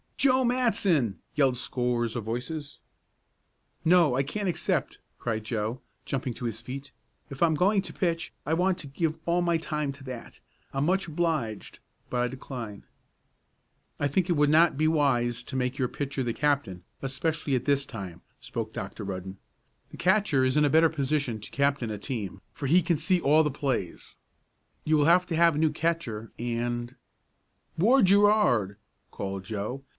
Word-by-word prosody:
"Joe 260 Hz, -1 st, +4 dB
Matson!" 195 Hz, -, +1 dB
yelled 135 Hz, -4 st, +3 dB
scores 120 Hz, -2 st, -1 dB
of 120 Hz, -, -2 dB
voices. 125 Hz, +7 st, -5 dB, 1.1 s
"No, 165 Hz, -5 st, +5 dB
I 135 Hz, -, +3 dB
can't 195 Hz, +9 st, -3 dB
accept," 170 Hz, -, -1 dB, 0.2 s
cried 110 Hz, -2 st, -2 dB
Joe, 110 Hz, +2 st, -3 dB, 0.2 s
jumping 130 Hz, -3 st, -3 dB
to 125 Hz, -, -6 dB
his 115 Hz, -1 st, -3 dB
feet. 135 Hz, +4 st, -7 dB, 0.4 s
"If 135 Hz, -, -8 dB
I'm 165 Hz, -2 st, +4 dB
going 195 Hz, +5 st, +3 dB
to -, -, -8 dB
pitch 170 Hz, 0 st, -1 dB
I 155 Hz, -, 0 dB
want 180 Hz, +2 st, +2 dB
to 150 Hz, -, -6 dB
give 155 Hz, +3 st, -1 dB
all 170 Hz, +1 st, +2 dB
my 170 Hz, -1 st, +2 dB
time 150 Hz, -3 st, -2 dB
to 140 Hz, 0 st, -14 dB
that. 125 Hz, -3 st, -8 dB, 0.3 s
I'm 135 Hz, +1 st, 0 dB
much 190 Hz, +2 st, +1 dB
obliged, 155 Hz, -, -2 dB, 0.3 s
but 125 Hz, -, +1 dB
I 125 Hz, -, +2 dB
decline." 120 Hz, -5 st, -7 dB, 1.2 s
"I 145 Hz, -, +2 dB
think 175 Hz, +6 st, 0 dB
it -, -, +4 dB
would 145 Hz, -1 st, +3 dB
not 165 Hz, -1 st, +5 dB
be 155 Hz, +1 st, +3 dB
wise 125 Hz, -6 st, +2 dB
to 130 Hz, -, -8 dB
make 125 Hz, +1 st, -1 dB
your 125 Hz, -, +2 dB
pitcher 140 Hz, 0 st, -3 dB
the 120 Hz, -2 st, -1 dB
captain, 135 Hz, -11 st, 0 dB, 0.2 s
especially 140 Hz, +1 st, -1 dB
at 125 Hz, -, -1 dB
this 140 Hz, -1 st, +2 dB
time," 95 Hz, -8 st, -8 dB, 0.2 s
spoke -, -, -5 dB
Dr. -, -, -6 dB
Rudden. 95 Hz, 0 st, -5 dB, 0.5 s
"The -, -, -11 dB
catcher 185 Hz, -6 st, +3 dB
is 130 Hz, 0 st, +2 dB
in 150 Hz, -, +5 dB
a -, -, +3 dB
better 160 Hz, +2 st, +5 dB
position 140 Hz, -6 st, -1 dB
to 105 Hz, -, -10 dB
captain 140 Hz, -4 st, +1 dB
a 105 Hz, -, -3 dB
team, 100 Hz, -5 st, -5 dB
for 140 Hz, -, -4 dB
he 175 Hz, +6 st, +5 dB
can 170 Hz, 0 st, +1 dB
see 180 Hz, +4 st, +2 dB
all 155 Hz, +2 st, +5 dB
the 150 Hz, -, 0 dB
plays. 130 Hz, -, -3 dB, 0.7 s
You 155 Hz, 0 st, +3 dB
will 145 Hz, -, +3 dB
have 175 Hz, +3 st, +5 dB
to 165 Hz, -, -2 dB
have 170 Hz, -1 st, +4 dB
a -, -, -1 dB
new 160 Hz, -1 st, +3 dB
catcher, 150 Hz, -10 st, -2 dB
and 120 Hz, +1 st, -3 dB, 0.4 s
" -, -, -43 dB
"Ward 230 Hz, +7 st, +5 dB
Gerard!" 200 Hz, -, +4 dB, 0.3 s
called 95 Hz, -1 st, -5 dB
Joe. 110 Hz, +6 st, -4 dB
140 Hz, 175 wpm, -27 LUFS, 120-165 Hz, 1.2 s, No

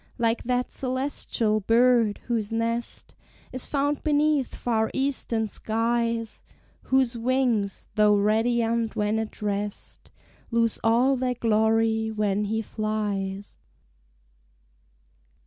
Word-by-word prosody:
Like 230 Hz, -1 st, +1 dB
that 250 Hz, 0 st, 0 dB
celestial 255 Hz, -4 st, -1 dB
bird, 230 Hz, 0 st, +3 dB
whose 225 Hz, -3 st, -2 dB
nest 230 Hz, +1 st, -3 dB, 0.4 s
Is 255 Hz, -, -4 dB
found 285 Hz, 0 st, 0 dB
beneath 295 Hz, -3 st, +1 dB
far 220 Hz, -2 st, 0 dB
Eastern 260 Hz, -5 st, 0 dB
skies, 230 Hz, +1 st, -1 dB, 0.4 s
Whose 260 Hz, -2 st, +2 dB
wings, 235 Hz, -4 st, 0 dB
though 210 Hz, -1 st, +4 dB
radiant 225 Hz, +2 st, +1 dB
when 210 Hz, +1 st, 0 dB
at 220 Hz, -1 st, -6 dB
rest, 205 Hz, 0 st, -4 dB, 0.4 s
Lose 230 Hz, -1 st, +1 dB
all 240 Hz, +4 st, +3 dB
their 250 Hz, 0 st, -1 dB
glory 220 Hz, -1 st, +2 dB
when 210 Hz, -1 st, 0 dB
he 220 Hz, +2 st, -1 dB
flies! 205 Hz, -3 st, -3 dB
230 Hz, 100 wpm, -25 LUFS, 215-245 Hz, 0.4 s, though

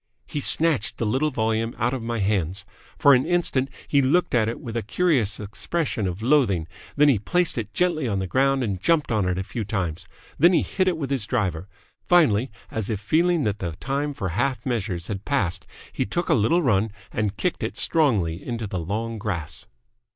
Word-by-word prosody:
He 150 Hz, -, -4 dB
snatched 155 Hz, -4 st, +3 dB
the 115 Hz, -, -1 dB
little 130 Hz, +8 st, +1 dB
volume 115 Hz, -2 st, -1 dB
out 120 Hz, +2 st, 0 dB
of 130 Hz, -, -3 dB
my 115 Hz, +1 st, -3 dB
hands. 95 Hz, -3 st, -1 dB, 0.3 s
For 140 Hz, -, +6 dB
an 125 Hz, 0 st, +4 dB
instant 155 Hz, -7 st, +1 dB, 0.2 s
he 140 Hz, -, +3 dB
looked 150 Hz, +7 st, +2 dB
at 115 Hz, -3 st, +3 dB
it 115 Hz, -, -5 dB
with 115 Hz, -2 st, -7 dB
a 115 Hz, -, 0 dB
curious 115 Hz, -, +1 dB
expression 110 Hz, -, -2 dB
of 90 Hz, +4 st, -5 dB
loathing, 115 Hz, -, +2 dB, 0.3 s
then 150 Hz, +1 st, +5 dB
he 130 Hz, -8 st, +4 dB
placed 175 Hz, -, 0 dB
it 105 Hz, -4 st, -4 dB
gently 170 Hz, -4 st, 0 dB
on 100 Hz, -3 st, -1 dB
the 95 Hz, -, -1 dB
ground 135 Hz, +6 st, +2 dB
and 100 Hz, -5 st, -3 dB
jumped 155 Hz, -, +2 dB
on 105 Hz, -4 st, +1 dB
it 90 Hz, -, -1 dB
a 95 Hz, -, -1 dB
few 115 Hz, +4 st, -4 dB
times. 95 Hz, -6 st, -3 dB, 0.3 s
Then 170 Hz, +5 st, +6 dB
he -, -, +3 dB
hit 185 Hz, -1 st, -1 dB
it 180 Hz, -3 st, +1 dB
with 140 Hz, -4 st, -4 dB
his 125 Hz, -7 st, +1 dB
driver. 95 Hz, -7 st, -1 dB, 0.4 s
Finally, 135 Hz, -, +4 dB, 0.2 s
as 110 Hz, -3 st, -3 dB
if 110 Hz, -3 st, -1 dB
feeling 165 Hz, -, +2 dB
that 105 Hz, -3 st, -1 dB
the 85 Hz, -3 st, -3 dB
time 140 Hz, -, -3 dB
for 95 Hz, -, -3 dB
half 125 Hz, +9 st, -1 dB
measures 100 Hz, -9 st, -2 dB
had 100 Hz, -1 st, -5 dB
passed, 95 Hz, -, -1 dB, 0.3 s
he -, -, 0 dB
took 170 Hz, -, -3 dB
a -, -, +5 dB
little 145 Hz, +11 st, +3 dB
run 110 Hz, -4 st, +2 dB, 0.2 s
and 105 Hz, -2 st, -2 dB
kicked 180 Hz, -, -1 dB
it -, -, -3 dB
strongly 100 Hz, -, +1 dB
into 115 Hz, -2 st, -4 dB
the 95 Hz, -3 st, -3 dB
long 110 Hz, +6 st, -3 dB
grass. 85 Hz, -5 st, -4 dB
115 Hz, 205 wpm, -24 LUFS, 100-140 Hz, 0.4 s, For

